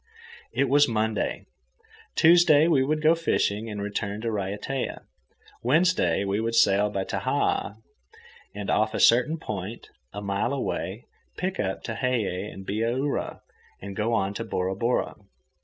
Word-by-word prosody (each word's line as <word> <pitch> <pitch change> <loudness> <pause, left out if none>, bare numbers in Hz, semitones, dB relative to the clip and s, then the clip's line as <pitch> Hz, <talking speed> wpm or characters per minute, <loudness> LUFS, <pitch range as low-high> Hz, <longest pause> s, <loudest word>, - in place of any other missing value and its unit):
It 140 - +1
was 145 +2 +5
Monday. 110 -1 -1 0.7
Tuesday 165 -2 +6
we 140 -6 +3
would 155 +3 -1
go 155 +1 +6
fishing 115 -9 0
and 105 -1 -5
return 100 0 -3
to 115 - -2
Raiatea. 105 +6 -3 0.6
Wednesday 130 - +2
we 100 +1 0
would 115 0 -1
sail 105 -2 +4
by 100 -2 -2
Tahaa 100 - -1 0.8
and 100 -1 -3
off 110 +1 +1
a - - -1
certain 130 +7 +4
point, 105 - -6 0.2
a 100 - -6
mile 100 +5 -1
away, 100 -5 -3 0.3
pick 185 +1 -3
up 95 -1 -2
Tehei 110 -5 -2
and 95 - -10
Bihaura 115 +8 -2 0.4
and 100 0 -8
go 110 +3 -1
on 100 -3 0
to 110 - -4
Bora 95 -4 -2
Bora. 115 +5 0
110 Hz, 140 wpm, -26 LUFS, 100-135 Hz, 0.8 s, Tuesday